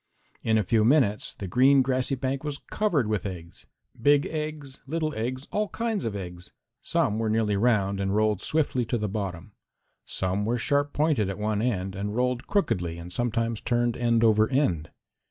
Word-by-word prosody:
In 110 -1 +2
a 110 - +2
few 110 +3 +2
minutes 115 -4 +2
the 100 - -6
green 130 +7 +5
grassy 130 +1 0
bank 130 +1 -2
was 145 -2 -3
covered 175 - +1
with 105 -1 -1
eggs 85 -4 -8 0.3
big 145 +3 +4
eggs, 150 -3 -5
little 155 +1 -1
eggs, 130 +5 -3
all 210 -1 0
kinds 225 -3 -2
of 110 -3 -2
eggs. 90 -2 -7 0.3
Some 105 +1 0
were 110 -1 0
nearly 110 -1 +1
round 100 -3 +2
and 95 0 0
rolled 105 -2 +2
swiftly 145 -5 +1
to 120 - -1
the 105 -1 -2
bottom. 95 -2 -4 0.5
Some 95 +2 -2
were 115 +3 0
sharp 145 +4 +1
pointed 145 -10 +1
at 95 - -4
one 105 0 -1
end 95 -6 -1
and 100 +2 -4
rolled 125 0 0
crookedly 90 - 0
and 85 +1 -9
sometimes 115 -1 -1
turned 120 -1 +1
end 115 -1 +2
over 110 -1 +4
end. 130 - +1
115 Hz, 180 wpm, -26 LUFS, 100-135 Hz, 0.5 s, green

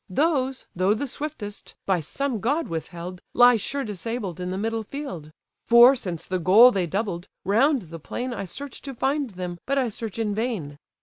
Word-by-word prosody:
Those, 270 - 0
though 185 +4 +3
the 285 - -2
swiftest, 265 -7 -6
by 190 -2 +2
some 245 - -2
god 285 +9 0
withheld, 175 +2 -6
Lie 245 -1 +7
sure 275 +6 -3
disabled 210 -3 -4
in 180 0 -3
the 185 - -3
middle 225 +2 -1
field: 200 - -7 0.3
For, 240 +3 +8
since 180 -9 -5
the 185 0 -2
goal 210 +9 +8
they 185 -6 0
doubled, 190 -1 -3 0.2
round 255 +5 +3
the 165 0 -9
plain 245 - -4
I 195 - -4
search 280 +9 -8
to 275 -2 -7
find 275 +2 0
them, 180 -3 -6
but 275 +1 +1
I 255 -3 +2
search 220 0 -6
in 220 -2 0
vain. 200 - -3
220 Hz, 185 wpm, -25 LUFS, 180-260 Hz, 0.3 s, For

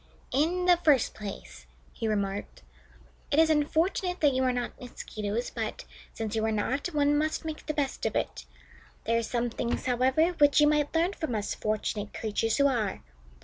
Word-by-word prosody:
"In 340 +6 +1
the 355 -1 +6
first 295 -7 +3
place," 65 - -8 0.3
he 225 - -3
remarked, 200 - -2 0.7
"it - - +1
is 320 0 +5
unfortunate 335 +5 +1
that 290 -3 +4
you 260 - +1
are 255 - +3
not 245 +2 -4
Mosquitoes, 220 -2 -4
but, - - -4 0.3
since 220 -1 -4
you 220 - 0
are 220 - +1
not, 255 +8 -1
one 295 -3 +2
must 310 +2 0
make 315 -1 -6
the 305 - 0
best 280 -3 -1
of - - -4
it. - - -2 0.6
There 230 +1 +2
are - - 0
some 240 +1 -1
things, 235 +1 -2
however, 260 +6 +3
which 290 0 +6
you 295 - +7
might 295 +1 +2
learn 340 +4 +2
from 315 - -3
us 205 -1 -2
fortunate 215 -1 -3
creatures 220 +1 0
who 280 - +4
are. 230 -8 0
260 Hz, 185 wpm, -28 LUFS, 220-305 Hz, 0.7 s, you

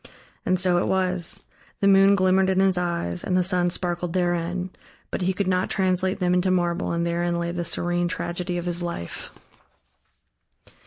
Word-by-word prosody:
And 185 0 +2
so 180 -1 +3
it - - -1
was: 185 -2 0 0.4
the 200 - +2
moon 195 0 +6
glimmered 190 0 +3
in 190 0 +2
his 190 -1 +4
eyes 170 - -2
and 180 - 0
the 180 - +3
sun 180 -1 +1
sparkled 175 -1 -2
therein. 175 0 -1 0.4
But - - -3
he 185 +1 +1
could 195 +2 -2
not 185 0 +1
translate 185 0 +1
them 180 -2 +1
into 180 +1 +2
marble 175 -2 0
and 170 0 -1
therein 170 0 -1
lay 170 0 -2
the 175 0 -3
serene 175 +1 -1
tragedy 175 +1 -3
of 175 - -4
his 175 0 -2
life. 170 - -5
180 Hz, 175 wpm, -24 LUFS, 175-185 Hz, 0.4 s, moon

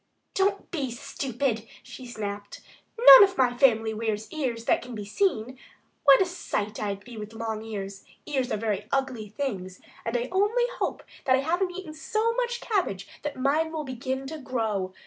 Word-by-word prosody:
"Don't 395 +1 0
be 285 -7 -2
stupid!" 245 -2 -3 0.2
she 255 - -10
snapped. 205 -3 -6 0.4
"None - - +11
of 390 -1 +2
my 250 -2 +3
family 225 -4 +4
wears 220 -1 -2
ears 245 -7 -2
that - - +3
can 245 -1 -8
be 210 -2 -5
seen. 255 - 0 0.5
What 275 -1 +8
a - - +5
sight 215 - -3
I'd 200 -1 -3
be 240 -2 -10
with 215 +1 -7
long 220 -1 -3
ears! 200 -3 -6 0.2
Ears 265 -4 -1
are - - +1
very 210 -1 -2
ugly 260 -6 -1
things, 195 -7 -4 0.2
and 230 +2 -1
I 240 +1 -2
only 415 +6 +2
hope - - -2 0.2
that 260 - +5
I 265 - +1
haven't 350 +6 0
eaten 355 -5 -7
so 435 +8 0
much 485 0 -1
cabbage 270 - -1
that 295 -2 -4
mine 300 +5 +1
will 315 -2 -3
begin 260 0 -4
to 310 +3 -6
grow.... 220 -8 -2
255 Hz, 180 wpm, -27 LUFS, 215-310 Hz, 0.5 s, None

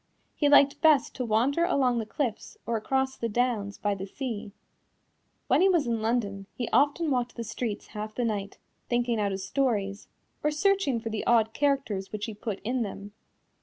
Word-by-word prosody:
He 290 - +2
liked 280 -1 +5
best 310 -4 +4
to 255 - -3
wander 245 +9 +2
along 260 -8 +2
the 220 - -4
cliffs 235 -3 -3
or 235 - -1
across 265 +4 0
the 230 - -3
downs 220 -3 0
by 205 -1 0
the 195 0 -5
sea. 225 -3 -5 0.9
When - - +3
he 385 - +6
was 345 -5 +3
in 230 -2 -1
London 205 -4 -1
he 240 - -3
often 290 +2 +3
walked 245 -2 -1
the 235 - -4
streets 225 -1 -4
half 215 0 -6
the 245 - 0
night, 205 -3 -3 0.3
thinking 240 -1 +1
out 205 -1 +1
his 190 0 -4
stories, 205 -4 -1 0.4
or 300 - +3
searching 305 - +2
for 225 0 -5
the 215 - -2
odd 225 -2 +4
characters 270 -9 0
which 215 0 -3
he 225 - -6
put 210 -1 -5
in 245 +3 -1
them. 205 -1 -5
235 Hz, 190 wpm, -28 LUFS, 210-270 Hz, 0.9 s, he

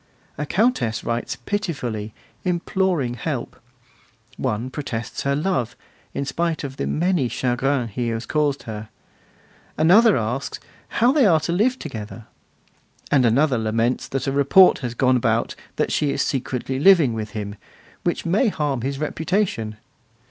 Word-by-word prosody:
A 150 - -4
Countess 190 - +1
writes 115 0 -2
pitifully, 125 - -3 0.3
imploring 175 -6 0
help; 120 - -4 0.8
one 115 +4 -2
protests 130 -5 -4
her 140 0 0
love, 145 - -1 0.4
in 140 - -1
spite 165 +3 -1
of 135 -1 -6
the - - -2
'many 170 -6 +1
chagrins' 125 -1 0
he 120 +3 -2
has 115 +1 -2
caused 150 -2 0
her; 110 -2 -7 0.9
another 200 +8 +6
asks 120 +4 -3 0.3
'how 240 +3 +3
they 275 -5 +4
are 165 -4 +5
to 165 - -2
live 230 +9 +2
together'; 110 - -7 0.9
another 130 0 +3
laments 115 +3 0
that 135 - -3
a 135 - 0
report 140 +7 +6
has 120 -3 -4
gone 130 -1 +3
about 115 -1 +1 0.2
that - - 0
she 150 - +1
is - - 0
secretly 130 0 -2
living 160 -7 +6
with 110 -1 -5
him, 100 -1 -4 0.5
which 175 - -1
may 195 +9 +2
harm 145 - -1
his 135 +3 -2
reputation. 155 - -1
135 Hz, 140 wpm, -22 LUFS, 120-170 Hz, 0.9 s, another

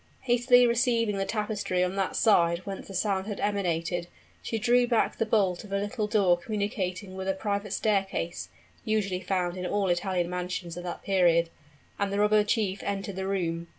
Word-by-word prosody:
Hastily 245 0 +4
raising 235 -3 +2
the 195 - 0
tapestry 210 -4 -1
on 180 +1 -1
that 195 -1 -1
side 170 -4 +3
whence 195 -1 -6
the 195 - -8
sound 195 -1 0
had 205 -2 -4
emanated, 175 -4 -1 0.3
she 225 - -3
drew 240 +3 +3
back 235 -2 +1
the 225 - +1
bolt 195 -5 +1
of 205 - -12
a 200 - +1
little 210 +2 -2
door 195 -5 +3
communicating 195 -2 -3
with 190 0 -5
a 195 - +1
private 200 0 -2
staircase 195 - -1 0.3
(usually 200 -4 -1
found 180 -1 -1
in 180 - -4
all 200 -1 0
Italian 175 0 0
mansions 180 -1 -4
at 175 - -6
that 175 - -6
period), 170 -3 +3 0.5
and 200 -1 0
the 200 - -1
robber 210 0 +4
chief 205 -2 0
entered 200 -1 -3
the 190 0 -3
room. 170 -3 -2
195 Hz, 185 wpm, -28 LUFS, 180-210 Hz, 0.5 s, Hastily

